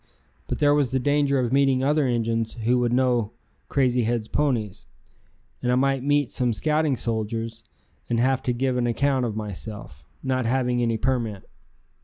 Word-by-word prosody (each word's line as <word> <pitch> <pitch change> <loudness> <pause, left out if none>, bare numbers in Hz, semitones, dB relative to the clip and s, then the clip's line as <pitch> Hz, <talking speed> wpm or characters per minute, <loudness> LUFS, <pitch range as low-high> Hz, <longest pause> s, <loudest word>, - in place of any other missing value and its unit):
But - - -2
there 145 -1 +4
was 145 -3 +2
the 130 +2 0
danger 145 +1 +2
of 125 -1 0
meeting 135 -1 +3
other 145 0 +2
Injuns 115 -2 -1
who 125 +2 +3
would 120 -1 +1
know 120 -3 +1 0.4
Crazy 125 -3 +2
Head's 115 -1 -1
ponies, 110 -9 -1 0.7
and 125 - 0
I - - +3
might 135 0 +1
meet 145 0 +1
some 125 -2 0
scouting 150 +3 +1
soldiers 115 0 -3 0.5
and 115 -1 +1
have 130 +2 +2
to 125 - -1
give 125 +1 0
an 120 -1 +1
account 130 +1 +1
of 110 - -4
myself, 105 -7 -6 0.2
not 130 -3 0
having 125 0 +1
any 115 -1 +1
permit. 115 -5 -2
125 Hz, 170 wpm, -24 LUFS, 115-135 Hz, 0.7 s, there